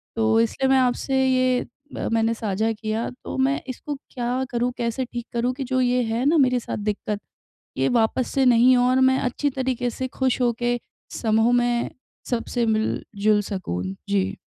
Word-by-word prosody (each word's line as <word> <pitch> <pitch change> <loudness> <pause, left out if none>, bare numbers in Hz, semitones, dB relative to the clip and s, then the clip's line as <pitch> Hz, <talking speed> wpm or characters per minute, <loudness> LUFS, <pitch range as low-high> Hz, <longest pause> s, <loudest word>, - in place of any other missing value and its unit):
तो 225 0 +3
इसलिए 265 +3 0
मैं 265 - +5
आपसे 255 +1 +1
ये 255 -1 +3 0.4
अ, - - -2
मैंने 225 0 +2
साझा 220 0 -1
किया 220 +1 -3
तो - - -5
मैं 270 +2 +1
इसको 290 +3 -5 0.2
क्या 250 +1 -1
करूँ, 245 +1 0
कैसे 240 +2 -1
ठीक 240 -1 -6
करूँ? 240 +2 0
कि 270 +1 -5
जो 260 0 -1
ये 250 0 +2
है 230 +3 -1
ना 315 +3 +4
मेरे 255 -3 +3
साथ - - -5
दिक्कत, 210 0 -3 0.6
ये - - +2
वापस 240 +1 +1
से 270 -1 +3
नहीं 250 +1 +6
हो 245 - +3
और 255 +1 +3
मैं 260 0 +4
अच्छी 270 +3 -1
तरीके 255 -2 -1
से 260 +2 -4
खुश 260 0 -1
होके 240 0 +1 0.4
समूह 225 +1 +3
में 240 -1 +1 0.4
सबसे 240 0 -1
मिल-जुल 215 -1 +1
सकूँ। 185 - -4 0.3
जी। 200 0 0
240 Hz, 180 wpm, -23 LUFS, 225-255 Hz, 0.6 s, नहीं